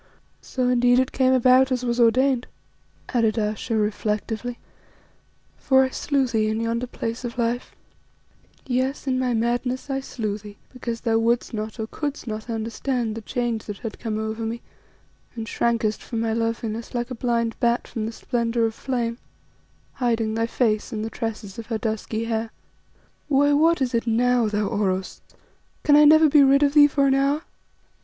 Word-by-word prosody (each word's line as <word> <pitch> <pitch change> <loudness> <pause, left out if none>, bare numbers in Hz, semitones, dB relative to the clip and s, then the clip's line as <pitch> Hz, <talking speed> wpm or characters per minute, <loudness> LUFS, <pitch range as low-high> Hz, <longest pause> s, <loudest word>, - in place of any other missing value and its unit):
"So 255 -1 -2
indeed 245 0 +4
it 260 0 +2
came 260 -1 +2
about 255 +1 +5
as 250 -1 -1
was 240 0 -1
ordained," 250 +2 +3 0.6
added 230 -2 +1
Ayesha 215 +1 -1
reflectively, 215 +2 -2 1.0
"for 265 -1 +4
I 260 - 0
slew 280 -1 0
thee 220 -3 0
in 220 +1 -1
yonder 230 +2 -1
Place 230 0 -5
of 240 0 -5
Life, 240 +1 -2 0.9
yes, 260 +2 -1
in 260 -2 0
my 250 -2 0
madness 245 +4 -1
I 270 - 0
slew 215 -6 -4
thee 205 0 -12 0.2
because 235 -2 -5
thou 225 -2 +2
wouldst 235 +2 0
not 215 +1 -5
or 220 - -1
couldst 290 +5 -5
not 215 0 -6
understand 230 +1 -2
the 225 - -6
change 235 -1 -2
that 205 -2 -6
had 225 +1 -7
come 220 -2 -3
over 220 +1 -3
me, 225 +1 -4 0.7
and 225 -1 -4
shrankest 230 -3 0
from 230 - -4
my 225 -1 0
loveliness 230 0 -3
like 240 +1 -2
a - - -1
blind 230 -2 -1
bat 235 0 +1
from 220 -2 -4
the - - -4
splendour 235 0 -1
of 225 - -1
flame, 235 -1 -3 0.7
hiding 230 -3 0
thy 225 +1 0
face 225 -1 0
in 215 -2 -3
the 225 - -4
tresses 220 -3 -5
of 225 - -8
her 225 - -1
dusky 220 0 -3
hair 225 0 -2 0.8
Why, 285 0 +3
what 320 0 +3
is 250 -1 -2
it 230 0 0
now, 240 +1 +3
thou 210 0 0
Oros? 195 -3 -2 0.6
Can 290 - +5
I 300 0 +7
never 315 +1 +7
be 295 0 +6
rid 275 +1 +5
of 285 -1 +2
thee 295 -1 +8
for 280 -1 +1
an 270 - +4
hour?" 280 +3 +1
235 Hz, 180 wpm, -23 LUFS, 225-255 Hz, 1.0 s, thee